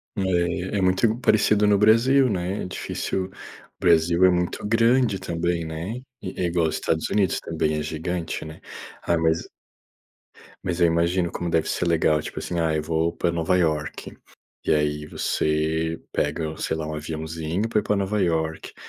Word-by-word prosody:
É, 90 Hz, +1 st, 0 dB
é -, -, +1 dB
muito 95 Hz, +4 st, +3 dB
i 115 Hz, +1 st, +1 dB
parecido 105 Hz, -2 st, +3 dB
no 105 Hz, -1 st, +5 dB
Brasil, 115 Hz, +6 st, +5 dB
né, 95 Hz, 0 st, -2 dB
é -, -, -4 dB
difícil 95 Hz, 0 st, -3 dB
o 95 Hz, -, -12 dB, 0.5 s
Brasil 85 Hz, +1 st, +4 dB
é -, -, +7 dB
muito 90 Hz, +2 st, -1 dB
grande 115 Hz, -1 st, +3 dB
também, 85 Hz, -1 st, -1 dB
né, 80 Hz, +8 st, -5 dB, 0.3 s
eh, 95 Hz, -1 st, -5 dB
é -, -, +2 dB
igual 85 Hz, -2 st, +1 dB
Estados 80 Hz, 0 st, -1 dB
Unidos 100 Hz, -3 st, +1 dB
também 80 Hz, -2 st, -1 dB
é 75 Hz, -, -2 dB
gigante, 80 Hz, +2 st, -3 dB
né. 80 Hz, 0 st, -9 dB, 0.4 s
Ah, 85 Hz, -, +2 dB
mas 80 Hz, 0 st, +1 dB, 1.2 s
mas 90 Hz, -2 st, -2 dB
eu 85 Hz, -, +6 dB
imagino 85 Hz, +1 st, +1 dB
como 85 Hz, -, -3 dB
deve 80 Hz, -1 st, +1 dB
ser 90 Hz, -, -1 dB
legal, 80 Hz, -2 st, +2 dB
tipo -, -, -6 dB
assim: 85 Hz, -, -3 dB
"Ah, 80 Hz, -1 st, +1 dB
eu 75 Hz, -, 0 dB
vou 80 Hz, +1 st, 0 dB
para 85 Hz, -, 0 dB
Nova 85 Hz, +2 st, +1 dB
Iorque". 75 Hz, -4 st, -2 dB, 0.5 s
E -, -, +3 dB
aí 75 Hz, 0 st, 0 dB
você 80 Hz, +2 st, -1 dB
pega, 80 Hz, +1 st, -2 dB
sei -, -, -2 dB
lá, 80 Hz, -1 st, -4 dB
um 80 Hz, -, -4 dB
aviãozinho 80 Hz, +5 st, -3 dB
para 110 Hz, -, +2 dB
ir -, -, -4 dB
para 105 Hz, -, +1 dB
Nova 100 Hz, +1 st, 0 dB
Iorque, 80 Hz, -3 st, -1 dB
85 Hz, 180 wpm, -24 LUFS, 80-95 Hz, 1.2 s, é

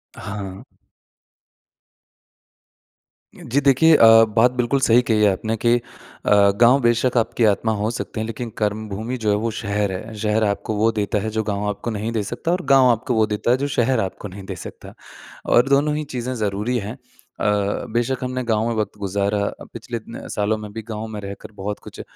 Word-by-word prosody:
हाँ। 100 Hz, -2 st, -7 dB, 2.7 s
जी 135 Hz, +4 st, -1 dB
देखिए 145 Hz, +4 st, +5 dB
अ, 115 Hz, -3 st, +8 dB
बात 120 Hz, +2 st, +5 dB
बिल्कुल 125 Hz, +3 st, +1 dB
सही 120 Hz, -1 st, +5 dB
कही 110 Hz, -2 st, +2 dB
है 105 Hz, -, +5 dB
आपने 110 Hz, +4 st, -2 dB
कि 120 Hz, +2 st, +3 dB
अ, -, -, -3 dB, 0.8 s
गाँव 125 Hz, +3 st, +6 dB
बेशक 120 Hz, +1 st, +2 dB
आपकी 115 Hz, +1 st, +1 dB
आत्मा 110 Hz, +2 st, +2 dB
हो 105 Hz, +1 st, -1 dB
सकते 115 Hz, -1 st, -5 dB
हैं 110 Hz, -, -2 dB
लेकिन 115 Hz, +1 st, -5 dB
कर्मभूमि 110 Hz, +3 st, -3 dB
जो 105 Hz, -, +2 dB
है 105 Hz, -, +3 dB
वो 115 Hz, +2 st, -1 dB
शहर 105 Hz, -2 st, -2 dB
है। 110 Hz, +4 st, -6 dB
शहर 105 Hz, +1 st, +1 dB
आपको 105 Hz, +1 st, -1 dB
वो 110 Hz, +2 st, +2 dB
देता 105 Hz, -1 st, -1 dB
है, 110 Hz, +2 st, -3 dB
जो 110 Hz, 0 st, -2 dB
गाँव 105 Hz, -1 st, -2 dB
आपको 105 Hz, +3 st, -4 dB
नहीं 110 Hz, +1 st, -3 dB
दे 110 Hz, -2 st, -1 dB
सकता 135 Hz, +10 st, -3 dB
और 180 Hz, +1 st, 0 dB
गाँव 135 Hz, -1 st, +5 dB
आपको 125 Hz, +3 st, -1 dB
वो 110 Hz, -1 st, +4 dB
देता 105 Hz, +2 st, 0 dB
है, 125 Hz, -, +4 dB
जो 140 Hz, +2 st, -2 dB
शहर 125 Hz, -2 st, +1 dB
आपको 95 Hz, +1 st, -4 dB
नहीं 100 Hz, +1 st, -10 dB
दे -, -, -6 dB
सकता, -, -, -10 dB, 0.5 s
और 120 Hz, +2 st, +4 dB
दोनों 145 Hz, +2 st, +3 dB
ही 155 Hz, -, -2 dB
चीज़ें 130 Hz, -3 st, -4 dB
ज़रूरी 105 Hz, +2 st, -1 dB
हैं। 105 Hz, 0 st, -5 dB
अ, 105 Hz, -1 st, -3 dB
बेशक 120 Hz, +2 st, -1 dB
हमने 130 Hz, 0 st, -3 dB
गाँव 110 Hz, -1 st, 0 dB
में 120 Hz, -, -1 dB
वक़्त 105 Hz, -1 st, -3 dB
गुज़ारा 100 Hz, +1 st, -1 dB
अ, -, -, -7 dB
पिछले 115 Hz, +1 st, -5 dB
इतने 115 Hz, +1 st, -9 dB
सालों 105 Hz, +1 st, 0 dB
में 105 Hz, -1 st, -8 dB
भी 110 Hz, -, -5 dB
गाँव 110 Hz, 0 st, -4 dB
में 110 Hz, -1 st, -6 dB
रहकर 100 Hz, +1 st, -8 dB
बहुत 105 Hz, +1 st, -4 dB
कुछ -, -, -10 dB
110 Hz, 200 wpm, -21 LUFS, 105-120 Hz, 2.7 s, अ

